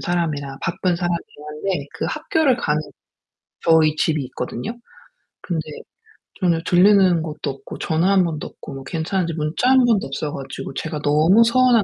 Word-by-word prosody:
사람이라 150 -6 -2
바쁜 170 +1 0
사람이긴 170 -4 -4
한데 150 0 -3
그 - - -3
학교를 310 -3 +1
가는 155 -10 0 0.8
저희 160 -2 +4
집이 155 -2 +1
있거든요. 125 - -5 0.7
근데 170 -4 -2 0.8
전혀 175 -4 +2
들리는 185 -2 +5
것도 155 -2 -5
없고 135 - -10
전화 165 +4 +1
1 195 -2 +4
번도 155 -3 -4
없고 - - -11
뭐 135 - -8
괜찮은지 165 +3 -2
문자 155 +10 0
1 260 -1 +5
번도 225 -5 +2
없어 145 +2 -4
가지고 135 -1 -7
제가 160 -2 -4
너무 160 +9 +5
서운한 245 -1 +4
165 Hz, 325 characters per minute, -21 LUFS, 150-195 Hz, 0.8 s, 들리는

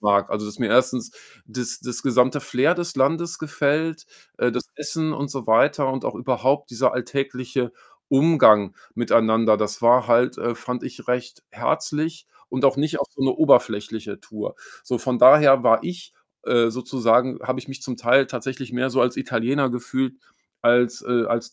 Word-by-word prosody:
mag. 100 -1 +2
Also, 105 0 -3
dass 105 - -10
mir 120 - -1
1. 130 0 +1 0.3
das 120 -2 -5
das 125 -1 -5
gesamte 130 +2 +2
Flair 135 +9 +1
des 175 -3 -5
Landes 165 +5 0
gefällt 155 +1 -2 0.3
äh, 125 - +1
das 125 +1 -4
Essen 155 +1 -3
und 140 -1 -4
so 135 -5 -6
weiter 135 +4 +2
und 135 - -4
auch - - -3
überhaupt 130 +3 -1
dieser 125 +1 0
alltägliche 125 -1 -3 0.4
Umgang 135 - +4 0.2
miteinander. 110 -2 +2
Das 105 +1 -3
war 120 +1 +5
halt, 120 +2 +2
äh, 120 -1 -2
fand 125 0 -6
ich, 125 - -10
recht 125 0 -3
herzlich 160 +2 -3 0.2
und 130 +2 -3
auch 135 0 +3
nicht 155 +1 -1
auf 140 - -3
so 135 - -6
'ne 135 - +2
oberflächliche 110 -7 +1
Tour. 105 -1 -7 0.3
So, 125 - -3
von 125 +1 -2
daher 135 0 +7
war 115 0 +4
ich, 175 0 -8 0.3
äh, 120 -1 +3
sozusagen 125 +1 0
habe 130 0 -3
ich 130 - -10
mich 135 0 -9
zum 130 -2 -6
Teil 130 +3 +3
tatsächlich 130 +1 -6
mehr 130 +2 -2
so 130 - 0
als 120 0 +1
Italiener 130 +3 -1
gefühlt 125 +1 -3 0.5
als 120 0 +2
äh, 120 -1 +1
als 115 +1 -3
125 Hz, 175 wpm, -22 LUFS, 120-140 Hz, 0.5 s, daher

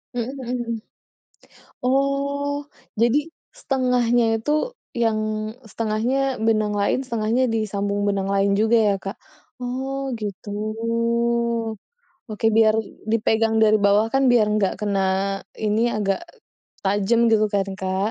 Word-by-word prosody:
Mhm 240 +1 -2
mhm 250 0 -3
mhm. 235 0 -3 1.1
Oh, 280 +2 0 0.4
jadi 240 +4 +4 0.3
1/2-nya 250 - +1 0.2
itu, 295 +7 -1 0.4
yang 215 -1 0 0.2
1/2-nya 225 +4 -1 0.3
benang 215 -2 +2
lain, 200 - +2
1/2-nya 235 +1 0
disambung 205 -2 -1
benang 195 -1 -1
lain 200 0 +2
juga 220 +2 +4
ya, 200 - +3
Kak? 195 +2 -7 0.4
Oh 265 +2 -3
gitu. 205 0 -6 1.8
Oke 215 +1 -1
biar 220 -1 +5 0.4
dipegang 225 0 +2
dari 215 0 +5
bawah 205 +2 +4
kan 270 - +3
biar 230 -3 +4
enggak 210 -3 +1
kena 200 -2 0 0.6
ini 210 +1 +1 0.2
agak 195 -2 0 0.6
tajam 205 +4 +2
gitu 215 -1 +4
kan, 195 -1 +1
Kak. 190 +2 -1
220 Hz, 115 wpm, -22 LUFS, 205-245 Hz, 1.8 s, biar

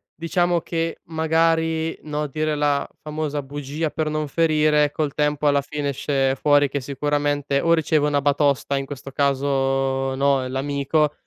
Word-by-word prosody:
diciamo 175 +1 0
che 165 -1 -3
magari, 160 0 +1
no, 150 0 -3
dire 155 +2 -2
la 145 -1 +1
famosa 150 -2 -3
bugia 145 +3 -4
per 155 -1 -2
non 155 0 -2
ferire, 150 -1 +3
col 150 -2 -2
tempo 150 0 0
alla 145 -1 +4
fine 145 0 -3
esce 135 0 0
fuori, 145 0 +3
che 140 - -2
sicuramente 145 +1 -1
o 170 0 +3
riceve 155 -2 +2
una 145 -1 +1
batosta, 140 -1 +1
in 135 - -3
questo 140 -1 -8
caso, 135 -1 0
no, 135 -1 +2
l'amico, 140 +3 0
145 Hz, 150 wpm, -22 LUFS, 140-155 Hz, -, alla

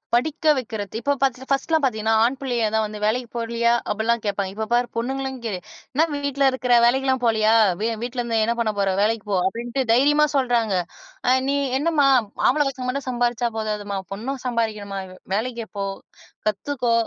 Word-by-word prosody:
படிக்க 310 +4 +2
வக்கிறத்து 220 -3 -4
இப்போ 285 - +1
பாத்து 265 -1 0
1லாம் 285 +3 +1
பாத்தீங்கன்னா, 220 -3 +1
ஆண் 255 +3 +1
பிள்ளைய 240 -5 0 0.2
வந்து, 210 0 -7
"வேலைக்குச் 235 +3 0
போலையா?" 235 0 +1 0.2
அப்படிலாம் 225 +2 0
கேப்பாங்க. 200 -2 -2
இப்ப 220 +1 -2
பாரு, 240 0 +3
பொண்ணுங்களையும் 265 +2 -2
கே 225 - -2 0.4
"என்னா 310 +4 +4
வீட்டுல 280 -1 0
இருக்கிற? 255 -1 0
வேலைக்கெல்லாம் 260 +1 +2
போலையா? 220 -1 +3 0.3
வெ 225 - +1 0.2
வீட்டுல 245 0 -3
இருந்து 230 -2 0
என்னா 235 +1 0
பண்ண 225 -2 +1
போற? 195 -1 +2
வேலைக்கு 220 0 +1
போ!"அப்டின்ட்டு 230 +8 0
தைரியமா 295 +5 +4
சொல்றாங்க. 240 -5 +2 0.5
அ, - - +5 0.2
நீ 280 - +2 0.2
என்னாம்மா, 300 -2 +3 0.4
ஆம்பள 295 +3 +3
பசங்க 255 -1 -6
மட்டும் 270 +1 -3
சம்பாரிச்சா 240 -1 0
போதாதுமா, 210 -2 -3 0.2
பொண்ணும் 255 +6 -4
சம்பாரிக்கணும்மா, 215 -5 -2 0.4
வேலைக்கு 235 +1 -2
போ, 200 - -1 0.6
கத்துக்கோ, 240 +3 0
240 Hz, 160 wpm, -23 LUFS, 220-265 Hz, 0.6 s, அ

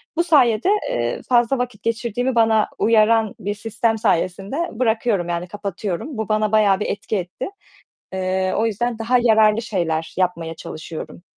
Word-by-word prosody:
Bu 340 - +2
sayede, 260 - +3 0.2
eee, 120 0 -2
fazla 240 +2 +3
vakit 245 -4 -4
geçirdiğimi 235 +2 -1
bana 225 -2 +3
uyaran 220 -1 +3
bir 205 +2 -2
sistem 225 +1 -1
sayesinde 195 +1 0 0.2
bırakıyorum, 220 -6 +1
yani 170 +1 -2
kapatıyorum. 200 - -5
Bu 220 -1 -3
bana 215 0 +1
bayağı 205 -3 +4
bir - - -2
etki 205 +1 -2
etti. 180 0 -5 0.7
Eee, 185 0 -1
o 220 +2 +2
yüzden 230 +2 -2
daha 240 +3 +2
yararlı 220 -1 +4
şeyler 165 -7 -2
yapmaya 170 -3 -1
çalışıyorum. 160 +2 -8
215 Hz, 150 wpm, -21 LUFS, 185-230 Hz, 0.7 s, bayağı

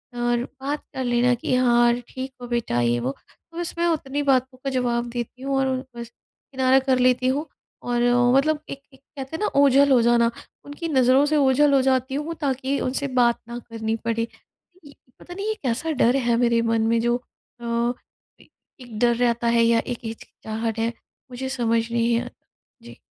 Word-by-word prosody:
और 240 0 0 0.2
बात 285 +2 -3
कर 265 - -2
लेना 245 0 +2
कि 250 +1 -1
हाँ 240 -1 +4 0.2
ठीक 260 +1 -6
हो 245 - -7
बेटा? 235 - -1
ये 120 0 +1
वो। 125 +2 -2 0.4
तो 335 - -12
बस 345 - -3
मैं 340 0 +1
उतनी 290 -3 -1
बातों 260 -1 +1
का 275 - -1
जवाब 240 -2 -1
देती 240 +1 -6
हूँ 275 0 -1
और 270 0 +1 0.3
बस 235 -1 -7 0.4
किनारा 260 0 +3
कर 260 -1 +1
लेती 255 0 +3
हूँ। 285 +5 0 0.4
और 240 0 -1 0.3
मतलब 300 +3 +2
एक 275 - -7
एक 265 - -19 0.2
कहते 270 +3 -6
हैं - - -5
ना - - +2
ओझल 280 0 +5
हो 250 -3 +5
जाना, 235 0 +3 0.3
उनकी 290 +4 -6
नज़रों 260 0 +4
से 305 +1 +1
ओझल 280 +1 +4
हो 270 - +5
जाती 260 0 0
हूँ 300 +4 -3
ताकि 275 0 -1
उनसे 270 +2 -2
बात 235 -1 +3
ना 235 0 -6
करनी 225 -1 -2
पड़े। 230 0 -1 0.6
ये 285 - -13 0.3
पता 355 - -11
नहीं 395 +3 -5
ये 435 - +1
कैसा 260 +6 -1
डर 240 +3 +4
है 240 -3 +1
मेरे 235 -1 +2
मन 230 -1 +1
में 230 0 +2
जो 240 +1 +1 0.5
अ, 235 +1 0 0.5
ए - - -21 0.3
एक 240 -3 -10
डर 240 0 +3
रहता 235 -1 0
है 235 0 +3
या 230 0 +4
एक 245 - -4
हिचकिचाहट 225 0 -5
है? 230 +1 0 0.4
मुझे 260 +2 -5
समझ 230 -3 +1
नहीं 235 0 +1
अ, - - -7 0.5
जी। - - -13
250 Hz, 195 wpm, -23 LUFS, 235-270 Hz, 0.6 s, ओझल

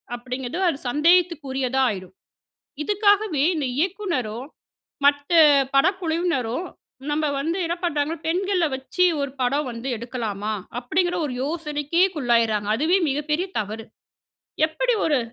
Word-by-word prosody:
அப்பிடிங்கிறது 255 +6 -5
அது 280 - -2
சந்தேகத்துக்குரியதா 290 -5 +2
ஆயிரும். 185 -2 -7 0.7
இதுக்காகவே 410 -5 +2
இந்த 295 -3 -1
இயக்குனரும், 295 - -2 0.6
மற்ற 285 +3 +2 0.4
படக்குழுவினரும் 335 - 0 0.4
நம்ம 305 +1 0 0.2
வந்து 330 +5 -1
என்ன 340 - -1
பண்றாங்க? 300 -1 0
பெண்கள 365 0 +1
வச்சு 265 +7 0 0.2
ஒரு 280 - -2
படம் 275 +3 +1
வந்து 235 +3 -6
எடுக்கலாமா? 220 -3 -4 0.3
அப்பிடிங்கிற 350 +8 0
ஒரு 255 - -5
யோசனைக்கே 300 +2 0
உள்ளாயிடறாங்க. 230 -5 +1
அதுவே 330 +8 +2
மிகப்பெரிய 300 +5 -1
தவறு. 215 +2 -6 0.8
எப்படி 475 +10 0
ஒரு 295 -5 +2
295 Hz, 110 wpm, -23 LUFS, 250-345 Hz, 0.8 s, சந்தேகத்துக்குரியதா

